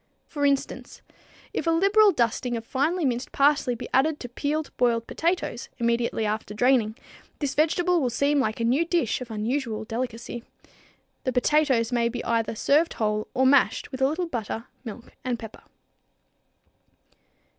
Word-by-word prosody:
For 285 Hz, -2 st, 0 dB
instance, 275 Hz, -1 st, -2 dB, 0.5 s
if -, -, -2 dB
a -, -, +4 dB
liberal 395 Hz, +5 st, +5 dB
dusting 240 Hz, -, 0 dB
of 225 Hz, -, -7 dB
finely 305 Hz, +7 st, 0 dB
minced 250 Hz, 0 st, -1 dB
parsley 280 Hz, -3 st, +3 dB
be -, -, -7 dB
added 295 Hz, +4 st, +3 dB
to 245 Hz, -, -6 dB
peeled, 295 Hz, +5 st, -3 dB
boiled 235 Hz, -2 st, +1 dB
potatoes, 345 Hz, +8 st, -2 dB
immediately 235 Hz, -2 st, 0 dB
after 210 Hz, 0 st, -3 dB
draining, 235 Hz, -2 st, +3 dB, 0.4 s
this 285 Hz, -3 st, -2 dB
vegetable 345 Hz, +3 st, +2 dB
will 255 Hz, -, +1 dB
seem 280 Hz, +5 st, +1 dB
like 220 Hz, -4 st, -1 dB
a -, -, -1 dB
new 255 Hz, +8 st, +3 dB
dish 335 Hz, -, 0 dB
of 250 Hz, -, -7 dB
unusual 220 Hz, +1 st, -2 dB
delicacy. 235 Hz, +1 st, -5 dB, 0.8 s
The 255 Hz, -, 0 dB
potatoes 260 Hz, -3 st, +2 dB
may 235 Hz, -1 st, +2 dB
be 240 Hz, +1 st, -5 dB
either 230 Hz, -1 st, 0 dB
served 295 Hz, +8 st, +2 dB
whole 215 Hz, -1 st, -1 dB
or 260 Hz, -, +3 dB
mashed 275 Hz, +1 st, +3 dB
with 260 Hz, -1 st, -6 dB
a 265 Hz, -, +5 dB
little 325 Hz, +5 st, -1 dB
butter, 230 Hz, -6 st, -4 dB, 0.2 s
milk 230 Hz, 0 st, -9 dB
and 250 Hz, -2 st, -1 dB
pepper. 225 Hz, -2 st, -10 dB
250 Hz, 155 wpm, -25 LUFS, 230-295 Hz, 0.8 s, liberal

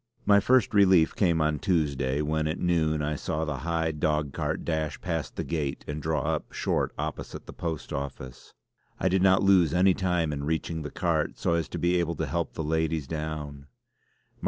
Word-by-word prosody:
My 100 Hz, 0 st, +6 dB
first 125 Hz, +2 st, +3 dB
relief 95 Hz, -5 st, +5 dB
came 85 Hz, -5 st, +2 dB
on 75 Hz, -1 st, +1 dB
Tuesday 70 Hz, -6 st, 0 dB
when 75 Hz, +1 st, 0 dB
at 80 Hz, -, -2 dB
noon 80 Hz, -3 st, +1 dB
I 75 Hz, +1 st, -1 dB
saw 75 Hz, +2 st, -2 dB
the 75 Hz, -3 st, -3 dB
high 80 Hz, +3 st, -1 dB
dog 75 Hz, -2 st, -1 dB
cart -, -, -2 dB
dash 80 Hz, -2 st, -2 dB
past 80 Hz, -4 st, -3 dB
the -, -, -2 dB
gate 75 Hz, -5 st, -3 dB
and 75 Hz, +1 st, -4 dB
draw 80 Hz, 0 st, 0 dB
up -, -, -2 dB
short -, -, -1 dB
opposite 75 Hz, +1 st, -5 dB
the -, -, -10 dB
post 80 Hz, -4 st, -5 dB
office. 65 Hz, -2 st, -7 dB, 0.4 s
I 95 Hz, -, +2 dB
did 95 Hz, 0 st, +2 dB
not 95 Hz, 0 st, +4 dB
lose 90 Hz, -5 st, +4 dB
any 95 Hz, +1 st, +5 dB
time 90 Hz, -4 st, 0 dB
in 70 Hz, -1 st, -4 dB
reaching 80 Hz, +1 st, -2 dB
the 75 Hz, -, -5 dB
cart -, -, -1 dB
so -, -, 0 dB
as 85 Hz, -3 st, -1 dB
to -, -, -5 dB
be 85 Hz, +1 st, +2 dB
able 85 Hz, -1 st, 0 dB
to -, -, -2 dB
help 85 Hz, -1 st, -2 dB
the 80 Hz, -, -4 dB
ladies 80 Hz, -1 st, 0 dB
down. 75 Hz, -2 st, -5 dB
80 Hz, 195 wpm, -27 LUFS, 75-85 Hz, 0.4 s, My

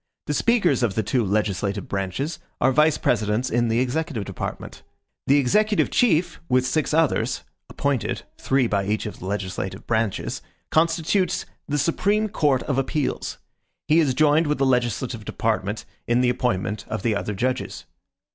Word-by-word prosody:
The 150 Hz, -, -1 dB
speakers 185 Hz, -, +2 dB
of 110 Hz, -6 st, +1 dB
the 110 Hz, -, +1 dB
two 120 Hz, +4 st, +1 dB
legislative 100 Hz, -1 st, -1 dB
branches 100 Hz, -, -3 dB, 0.2 s
are 130 Hz, -, +4 dB
vice 150 Hz, +3 st, +4 dB
presidents 110 Hz, +2 st, 0 dB
in 120 Hz, 0 st, +2 dB
the 115 Hz, +1 st, +1 dB
executive 130 Hz, -3 st, -1 dB
department. -, -, -6 dB, 0.5 s
The 140 Hz, -, +5 dB
executive 210 Hz, -, +2 dB
chief, 180 Hz, -8 st, +2 dB
with 130 Hz, 0 st, +3 dB
six 145 Hz, +4 st, 0 dB
others, 160 Hz, -1 st, +1 dB, 0.3 s
appointed, 140 Hz, -4 st, -1 dB, 0.2 s
three 135 Hz, -1 st, +2 dB
by 100 Hz, -3 st, 0 dB
each 105 Hz, +1 st, -1 dB
of 105 Hz, -, -6 dB
the 95 Hz, -, -7 dB
legislative 95 Hz, -2 st, -4 dB
branches 110 Hz, -3 st, -1 dB, 0.3 s
constitutes 170 Hz, +3 st, +1 dB, 0.2 s
the 145 Hz, -, 0 dB
Supreme 200 Hz, +8 st, +1 dB
Court 145 Hz, -8 st, +1 dB
of 135 Hz, -2 st, 0 dB
Appeals; 140 Hz, +1 st, -2 dB, 0.5 s
he 155 Hz, +2 st, +5 dB
is 140 Hz, -6 st, +2 dB
joined 155 Hz, +2 st, +4 dB
with 150 Hz, -, +1 dB
the 135 Hz, -, +2 dB
legislative 120 Hz, -2 st, 0 dB
department 105 Hz, -1 st, -2 dB, 0.2 s
in 120 Hz, +1 st, +3 dB
the 125 Hz, -, +3 dB
appointment 110 Hz, -5 st, -1 dB
of 110 Hz, -2 st, -4 dB
the 115 Hz, -3 st, +1 dB
other 100 Hz, +1 st, -3 dB
judges. 125 Hz, 0 st, -2 dB
125 Hz, 155 wpm, -23 LUFS, 110-155 Hz, 0.5 s, The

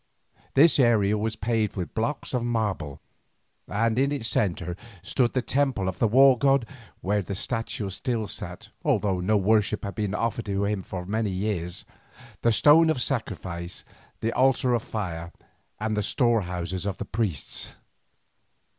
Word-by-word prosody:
This 155 Hz, +2 st, +6 dB
area 110 Hz, -5 st, +4 dB
was 110 Hz, +1 st, -1 dB
paved 110 Hz, -2 st, -1 dB
with 90 Hz, -3 st, -4 dB
blocks 135 Hz, +7 st, -2 dB
of 125 Hz, -2 st, 0 dB
marble, 105 Hz, -, -2 dB, 0.7 s
and 115 Hz, +3 st, +1 dB
in 140 Hz, +1 st, +2 dB
its 140 Hz, -6 st, -2 dB
centre 90 Hz, -3 st, 0 dB, 0.3 s
stood 125 Hz, -3 st, +1 dB
the 130 Hz, -, 0 dB
temple 130 Hz, -9 st, 0 dB
of 95 Hz, -, -3 dB
the 115 Hz, -, +4 dB
war 130 Hz, +2 st, +6 dB
god, 135 Hz, -3 st, +3 dB, 0.4 s
where 105 Hz, +2 st, +1 dB
his 100 Hz, 0 st, -5 dB
statue 115 Hz, -2 st, -3 dB
still 115 Hz, +2 st, -2 dB
sat, -, -, -7 dB
although 95 Hz, -3 st, +1 dB
no 105 Hz, +4 st, +2 dB
worship 105 Hz, +1 st, +2 dB
had 100 Hz, -, -4 dB
been 105 Hz, +1 st, -2 dB
offered 115 Hz, +1 st, -1 dB
to 100 Hz, -1 st, -1 dB
him 100 Hz, -1 st, -1 dB
for 90 Hz, -1 st, -6 dB
many 110 Hz, +2 st, -1 dB
years; 95 Hz, -2 st, -3 dB, 0.6 s
the 115 Hz, -, +3 dB
stone 155 Hz, +7 st, +6 dB
of 155 Hz, -, +1 dB
sacrifice, 95 Hz, -9 st, -3 dB, 0.4 s
the 115 Hz, +1 st, 0 dB
altar 130 Hz, -1 st, +3 dB
of 120 Hz, -, +1 dB
fire, 85 Hz, -7 st, -5 dB, 0.5 s
and 110 Hz, 0 st, -1 dB
the 105 Hz, -, +1 dB
storehouses 95 Hz, -, 0 dB
of 95 Hz, -1 st, -3 dB
the -, -, -5 dB
priests. 100 Hz, -, -3 dB
110 Hz, 155 wpm, -26 LUFS, 95-120 Hz, 0.7 s, This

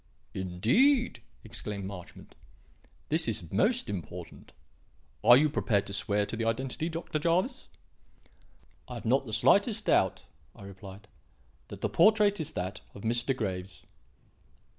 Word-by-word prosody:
"Indeed!" 125 Hz, -, +2 dB, 0.2 s
exclaimed 105 Hz, -3 st, -5 dB
Marchmont. 95 Hz, -3 st, -10 dB, 0.8 s
"This 160 Hz, +2 st, +1 dB
is 95 Hz, -8 st, -3 dB
most 235 Hz, +4 st, +1 dB
important. 90 Hz, -6 st, -7 dB, 0.7 s
Are 120 Hz, +3 st, +9 dB
you 155 Hz, +3 st, +4 dB
prepared 110 Hz, -8 st, 0 dB
to 100 Hz, -, -7 dB
swear 105 Hz, 0 st, 0 dB
to 115 Hz, -, -5 dB
the 115 Hz, -, -2 dB
identity, 130 Hz, +7 st, -1 dB
Dr. 165 Hz, -2 st, -3 dB
Jervis?" 180 Hz, -, 0 dB, 1.2 s
"I -, -, -7 dB
have -, -, -8 dB
not -, -, +2 dB
the -, -, -6 dB
slightest 205 Hz, +2 st, +3 dB
doubt," -, -, +2 dB, 0.3 s
I -, -, -13 dB
replied, 100 Hz, +1 st, -11 dB, 0.6 s
"that -, -, -10 dB
the -, -, +1 dB
portrait 210 Hz, -2 st, +4 dB
is 160 Hz, 0 st, -4 dB
that 95 Hz, +3 st, -4 dB
of 100 Hz, -, -10 dB
Mr. 120 Hz, +3 st, 0 dB
Graves." 95 Hz, -4 st, -4 dB
115 Hz, 135 wpm, -29 LUFS, 100-165 Hz, 1.2 s, Are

